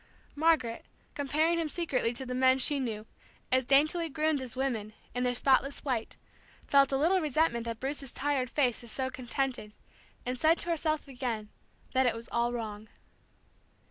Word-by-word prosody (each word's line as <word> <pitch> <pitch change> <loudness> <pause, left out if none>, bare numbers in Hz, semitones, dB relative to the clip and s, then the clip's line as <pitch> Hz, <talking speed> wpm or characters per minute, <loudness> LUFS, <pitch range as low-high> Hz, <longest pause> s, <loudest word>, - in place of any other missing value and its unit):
Margaret, 295 -7 +2 0.3
comparing 310 +4 +1
him 320 -2 -1
secretly 285 -9 0
to 260 +2 -6
the 250 - -4
men 260 +1 +4
she 280 +2 +2
knew, 220 -5 -3 0.5
as 260 0 +3
daintily 310 +5 +3
groomed 310 -1 +1
as 255 -2 -7
women, 235 -5 -2 0.2
in 245 - -2
their 250 0 +1
spotless 270 +2 +2
white, 245 -5 -2 0.5
felt 275 -1 +4
a 270 - +2
little 355 +6 +3
resentment 295 -6 +1
that 230 -1 -4
Bruce's 275 -1 -4
tired 270 -2 -1
face 250 -5 +2
was 235 -2 -5
so 260 -1 0
contented, 255 -3 -3 0.5
and 250 0 -3
said 320 +4 +4
to 345 - -6
herself 310 -2 -1
again 245 -5 -4 0.4
that 260 -1 +3
it 235 - +1
was 230 0 -8
all 235 0 +1
wrong. 220 -2 -5
260 Hz, 170 wpm, -30 LUFS, 240-295 Hz, 0.5 s, men